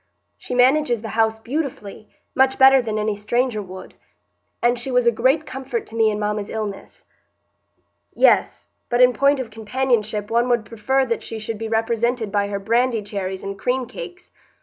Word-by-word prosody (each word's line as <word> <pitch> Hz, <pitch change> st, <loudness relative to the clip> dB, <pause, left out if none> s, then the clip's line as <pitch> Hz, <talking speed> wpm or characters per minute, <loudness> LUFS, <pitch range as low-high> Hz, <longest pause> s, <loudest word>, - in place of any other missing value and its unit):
She 250 Hz, -, -5 dB
manages 250 Hz, -2 st, +3 dB
the 220 Hz, -, -5 dB
house 220 Hz, 0 st, +2 dB
beautifully,—much 260 Hz, 0 st, -3 dB
better 265 Hz, 0 st, +7 dB
than 220 Hz, -3 st, -3 dB
any 210 Hz, 0 st, -1 dB
stranger 225 Hz, +2 st, -1 dB
would,—and 200 Hz, +5 st, -6 dB
she 245 Hz, -, -4 dB
was 250 Hz, -1 st, +2 dB
a 235 Hz, -, +5 dB
great 260 Hz, +7 st, +1 dB
comfort 270 Hz, -, -5 dB
to 225 Hz, -, -11 dB
me 225 Hz, -1 st, +3 dB
in 210 Hz, -, -2 dB
mamma's 210 Hz, -1 st, -2 dB
illness." 215 Hz, -3 st, -6 dB, 1.1 s
"Yes, -, -, +2 dB, 0.2 s
but 240 Hz, -, 0 dB
in 250 Hz, 0 st, +6 dB
point 280 Hz, +2 st, +3 dB
of 240 Hz, -4 st, -5 dB
companionship 220 Hz, -2 st, -1 dB
one 235 Hz, +2 st, +2 dB
would 235 Hz, -3 st, +1 dB
prefer 265 Hz, +5 st, 0 dB
that 235 Hz, -2 st, -2 dB
she 225 Hz, -, -6 dB
should 215 Hz, 0 st, -5 dB
be 225 Hz, 0 st, -4 dB
represented 225 Hz, 0 st, 0 dB
by 200 Hz, -1 st, +1 dB
her 200 Hz, 0 st, -3 dB
brandy 230 Hz, +2 st, +1 dB
cherries 190 Hz, -2 st, -4 dB
and 195 Hz, 0 st, -6 dB
cream 255 Hz, 0 st, 0 dB
cakes. 360 Hz, +9 st, -10 dB
230 Hz, 170 wpm, -21 LUFS, 215-255 Hz, 1.1 s, better